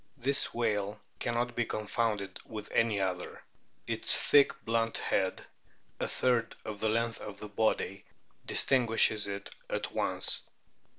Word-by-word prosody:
This 135 +2 +1
whale 105 -3 -1 0.2
cannot 120 0 -1
be 120 - +2
confounded 110 -2 -2
with 105 -2 -8
any 115 -3 +2
other; 90 -2 -3 0.4
its - - +4
thick, 145 -1 +5
blunt 115 0 +1
head, 95 -1 -1 0.5
a - - -1
third 120 -3 +1
of 105 -1 -5
the 110 - +1
length 115 +1 0
of 105 - -8
the 105 - -7
body, 100 -2 0 0.4
distinguishes 115 -5 +3
it 100 0 -5 0.2
at - - -2
once. - - +1
110 Hz, 130 wpm, -31 LUFS, 105-115 Hz, 0.5 s, thick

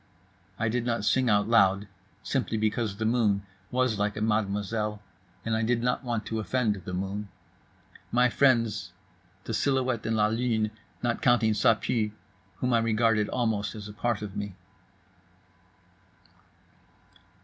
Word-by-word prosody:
I 115 - 0
did 120 +2 0
not 115 -3 -1
sing 125 +4 +3
out 105 -1 +3
loud, 100 -3 +4 0.4
simply 125 -4 -1
because 110 -1 -1
the 110 - -2
moon 110 -4 +2 0.2
was 125 -4 +1
like 105 +1 0
a - - -3
mademoiselle, 105 0 0 0.5
and 115 -1 0
I 110 - 0
did 115 +1 +1
not 125 +2 0
want 120 -3 -2
to 110 - -3
offend 115 0 +1
the 90 - -5
moon. 100 +2 -4 0.8
My 125 +1 +4
friends: 120 -4 +2 0.5
the - - -4
silhouette 130 -4 0
and 110 0 +1
la 105 - +4
lune, 110 -1 0 0.3
not 120 -1 0
counting 115 -3 +4
Ça 110 +1 +3
Pue, 105 -3 -1 0.4
whom 125 +6 -1
I 115 - +5
regarded 115 -1 +2
almost 110 -4 -1
as 105 -1 -7
a 105 - -9
part 115 -1 -1
of 100 -1 -7
me. 100 -2 -4
110 Hz, 150 wpm, -28 LUFS, 105-120 Hz, 0.8 s, I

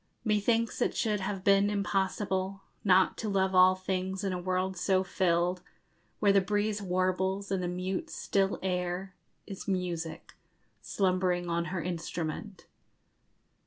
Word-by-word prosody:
Methinks 225 +2 +1
it - - +1
should 210 -2 +1
have 190 0 -3
been 200 0 +4
impossible 195 -1 -1 0.2
Not 190 -1 +4
to 220 - -2
love 190 -1 +1
all 185 0 +7
things 185 +1 -3
in 195 -2 -1
a 180 - -3
world 185 +1 -1
so 185 +1 +2
filled, 180 -1 +1 0.6
Where 200 -2 +4
the 195 - +5
breeze 205 +2 0
warbles, 190 +1 0
and 190 -1 0
the 180 - -1
mute 180 +1 -3
still 195 0 0
air 180 0 -2 0.3
_Is 195 +1 -8
music, 175 -4 -3 0.5
slumbering 185 -2 0
on 170 0 0
her 185 -1 -3
instrument. 175 +2 -4
190 Hz, 135 wpm, -30 LUFS, 180-195 Hz, 0.6 s, all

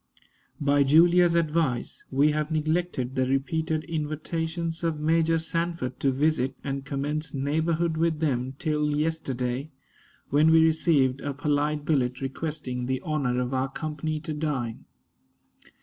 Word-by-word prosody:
By 145 0 +3
Julia's 170 +4 +5
advice 155 -6 0
we 140 +3 +3
have 150 0 -1
neglected 155 -4 -1
the 130 -1 +1
repeated 155 +4 0
invitations 160 +1 -3
of 165 -2 -1
Major 165 +1 +2
Sanford 165 -4 -2
to 135 - +2
visit 135 -1 +1
and 135 -1 -3
commence 145 +3 -3
neighborhood 160 +4 0
with 165 -1 +1
them 130 -4 -1
till 150 -2 0
yesterday, 140 -4 -2 0.6
when 150 +3 +5
we 160 0 +6
received 150 -5 +2
a 140 -1 -3
polite 145 +1 0
billet 125 -5 +1
requesting 135 -2 -4
the 130 0 0
honor 140 -7 -1
of 125 +1 -2
our 130 +1 0
company 155 +1 -3
to 155 0 -4
dine. 140 -7 -3
150 Hz, 135 wpm, -26 LUFS, 135-160 Hz, 0.6 s, we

